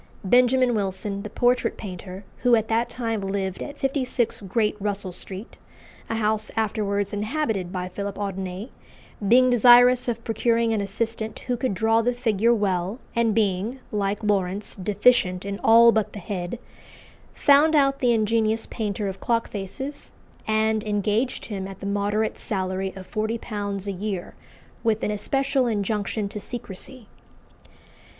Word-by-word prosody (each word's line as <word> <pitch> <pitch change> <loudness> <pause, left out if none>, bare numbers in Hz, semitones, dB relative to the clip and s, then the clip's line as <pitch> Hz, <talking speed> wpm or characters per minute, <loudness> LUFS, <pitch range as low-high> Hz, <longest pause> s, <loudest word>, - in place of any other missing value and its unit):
Benjamin 250 +4 +4
Wilson, 200 -1 -2
the 210 - -6
portrait 245 +3 +1
painter, 185 -1 -8
who 245 -1 +4
at 220 -1 0
that 230 +1 +1
time 225 -4 -3
lived 195 -1 -3
at 290 0 -6
56 260 -5 -1
Great 210 +2 0
Russell 200 -2 -3
Street, 190 +4 -5 0.5
a - - -1
house 215 -1 0
afterwards 205 -2 -1
inhabited 210 - -2
by 180 -1 -3
Philip 200 +2 -5
Audinet, 195 +2 -4 0.6
being 255 +3 +6
desirous 245 +1 +6
of 230 -1 -2
procuring 230 0 +1
an 215 - 0
assistant 220 +2 -2
who 250 - -2
could 240 -4 -1
draw 225 +2 +3
the 245 +1 0
figure 230 -2 +2
well, 195 -2 0 0.2
and 230 -2 +2
being, 215 +3 0
like 205 0 -1
Lawrence, 200 -1 -1
deficient 195 -1 +2
in 200 0 -4
all 230 +1 +7
but 220 -2 0
the - - -7
head, 180 +2 -4 0.7
found 295 +3 +4
out 275 -2 +3
the 245 -2 +3
ingenious 225 0 +1
painter 210 -2 -3
of 190 0 -5
clock 230 -1 0
faces, 265 +9 -6 0.3
and 220 0 +1
engaged 210 +4 -1
him 195 -3 -5
at 195 -1 -10
the - - -7
moderate 205 +2 -1
salary 190 -1 -2
of 190 -1 -9
forty 220 +3 -2
pounds 205 -3 -4
a - - 0
year, 195 -1 -4 0.5
with 220 -2 +1
an - - 0
especial 270 +5 0
injunction 210 -1 -1
to 210 - -6
secrecy. 235 +2 -8
215 Hz, 150 wpm, -24 LUFS, 200-235 Hz, 0.7 s, all